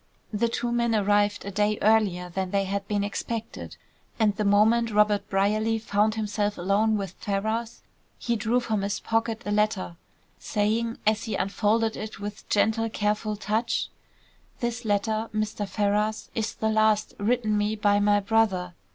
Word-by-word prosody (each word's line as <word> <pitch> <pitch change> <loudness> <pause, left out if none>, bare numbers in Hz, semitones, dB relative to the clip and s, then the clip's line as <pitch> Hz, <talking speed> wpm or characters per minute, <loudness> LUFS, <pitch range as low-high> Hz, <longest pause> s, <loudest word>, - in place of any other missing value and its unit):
The 230 +3 +1
two 240 +1 -2
men 235 -1 +1
arrived 205 0 +2
a 200 - -4
day 210 +1 +1
earlier 205 -5 +2
than 185 +1 -3
they 195 +1 +1
had 195 +1 -3
been 205 -1 0
expected, 225 +2 -5 0.4
and 210 -2 +3
the 210 - -1
moment 220 +3 +4
Robert 210 -1 +2
Brierly 215 +3 +1
found 215 0 +1
himself 210 -1 -1
alone 205 +4 +2
with 195 -3 -4
Ferrars 220 +3 -2 0.3
he 235 - -1
drew 230 +2 +1
from 220 -4 -1
his 200 0 -2
pocket 225 0 -1
a 205 - -2
letter, 205 -4 0 0.4
saying, 225 +2 -1
as 215 +1 +2
he 220 - -2
unfolded 220 +3 +1
it 215 -1 -7
with 205 +1 -7
gentle, 220 +2 +2
careful 210 0 -1
touch: 215 +3 -1 0.7
"This 240 0 -3
letter, 215 +2 0
Mr. 210 -1 -2
Ferrars, 210 +2 0
is 225 -1 -2
the 220 - -1
last 215 -1 +2
written 215 0 +1
me 210 +1 0
by 205 -1 +2
my 205 0 +3
brother. 195 -4 +1
210 Hz, 160 wpm, -26 LUFS, 205-225 Hz, 0.7 s, moment